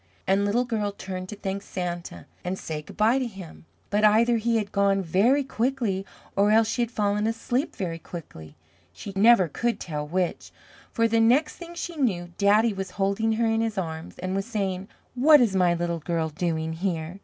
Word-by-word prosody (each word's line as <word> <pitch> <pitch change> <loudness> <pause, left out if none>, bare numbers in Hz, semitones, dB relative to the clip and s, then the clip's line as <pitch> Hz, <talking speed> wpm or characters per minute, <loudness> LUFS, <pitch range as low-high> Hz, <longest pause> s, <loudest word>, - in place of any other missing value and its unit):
And 195 +1 +2
Little 235 +5 +1
Girl 215 -4 -1
turned 185 -2 -6
to 210 - -6
thank 195 0 -4
Santa 175 -2 -5 0.2
and 180 +1 -3
say 155 -4 -5
goodbye 220 - +1
to 255 - -1
him, 190 -7 -11 0.3
but 205 +1 +1
either 230 +3 +5
he 230 +1 +1
had 205 -2 -3
gone 200 -1 +2
very 215 - +3
quickly, 235 -7 -1 0.3
or 200 +1 +3
else 220 +1 +4
she 240 - -1
had 235 - 0
fallen 210 -2 0
asleep 245 +7 -2
very 170 -4 -4
quickly 80 - -10 0.4
she 145 - -9
never 200 -2 +6
could 235 +10 -2
tell 150 -3 -4
which 180 +2 -2 0.4
for 230 -1 +2
the 230 0 +2
next 255 +7 +3
thing 345 0 -10
she 340 -1 -5
knew, 180 -11 0
Daddy 210 +2 +4
was 195 -1 -5
holding 200 +3 +1
her 230 +1 +1
in 225 0 +1
his 225 -2 -2
arms 160 -3 -5
and 185 +1 -3
was 195 +2 -2
saying, 195 -5 -2 0.3
"What 295 +4 +6
is 225 -6 +2
my 180 -2 +3
Little 170 0 -2
Girl 165 0 -1
doing 160 0 -2
here? 170 0 -3
200 Hz, 190 wpm, -25 LUFS, 180-230 Hz, 0.4 s, never